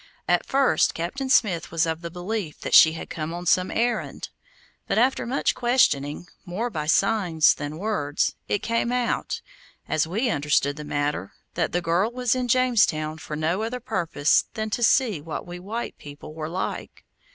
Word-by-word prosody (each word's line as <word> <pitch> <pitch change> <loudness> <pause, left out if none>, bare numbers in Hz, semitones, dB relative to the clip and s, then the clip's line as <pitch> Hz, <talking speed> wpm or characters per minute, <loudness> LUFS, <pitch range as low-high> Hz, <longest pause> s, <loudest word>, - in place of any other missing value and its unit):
At - - +2
first 275 0 +2
Captain 225 +12 -3
Smith 185 - +2
was 165 +1 +1
of 160 0 -3
the 170 - -5
belief 180 -1 -4
that - - -4
she 160 -1 +8
had 160 - -7
come 160 +1 -5
on 175 +1 -6
some 185 +1 +3
errand; 240 +1 -2 0.6
but - - 0
after 250 +1 +2
much 265 +4 +1
questioning, 175 - +1 0.2
more 220 +7 -3
by 150 -6 -4
signs 180 -3 +3
than 145 +1 -6
words, 175 -7 -1
it 205 - -1
came 230 +1 0
out, 250 -1 -1 0.5
as 155 0 +1
we 225 +8 0
understood 145 -2 +1
the 150 - -6
matter, 145 -9 -2 0.2
that - - -1
the 175 0 -1
girl 175 +7 +1
was 250 -1 0
in 255 -1 -1
Jamestown 215 -12 +2
for 155 - -6
no 160 +6 0
other 235 +3 -3
purpose 170 -10 +1
than 220 0 -3
to 240 - -2
see 225 - +3
what 160 +1 -6
we 175 0 -8
white 220 +6 -5
people 145 +1 -10
were 155 0 -5
like. 180 +3 -5
175 Hz, 175 wpm, -24 LUFS, 155-230 Hz, 0.6 s, she